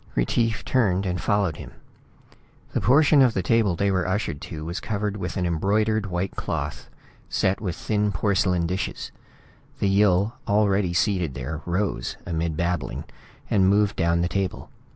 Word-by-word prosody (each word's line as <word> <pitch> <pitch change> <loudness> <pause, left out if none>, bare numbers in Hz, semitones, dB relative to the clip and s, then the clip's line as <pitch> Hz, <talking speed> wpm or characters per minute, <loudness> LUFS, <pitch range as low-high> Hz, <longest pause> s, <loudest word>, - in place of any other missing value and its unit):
Retief 110 - 0
turned 100 -7 +1
and 90 -1 -2
followed 100 -7 +1
him. - - -10 1.0
The - - -1
portion 145 +3 +5
of 125 -4 +4
the 95 - 0
table 105 -2 +2
they 100 +3 +1
were 95 -2 0
ushered 95 -6 -2
to 80 -3 -6
was 85 +3 -4
covered 105 -1 -2
with 95 -2 -4
an 90 - 0
embroidered 105 +5 +1
white 90 +1 -3
cloth, - - -4 0.4
set 95 +1 0
with 90 -5 -3
thin 105 +1 0
porcelain 90 -2 +1
dishes. 90 +3 -3 0.7
The - - 0
Yill 100 +1 +3
already 100 -3 +2
seated 90 -8 +1
there 70 +5 -5
rose, 90 -8 -1
amid 80 -2 -2
babbling, 85 -4 -2 0.4
and 95 -2 +3
moved 100 0 +3
down 85 +1 +1
the 85 - +1
table. 95 0 -3
95 Hz, 155 wpm, -24 LUFS, 85-105 Hz, 1.0 s, portion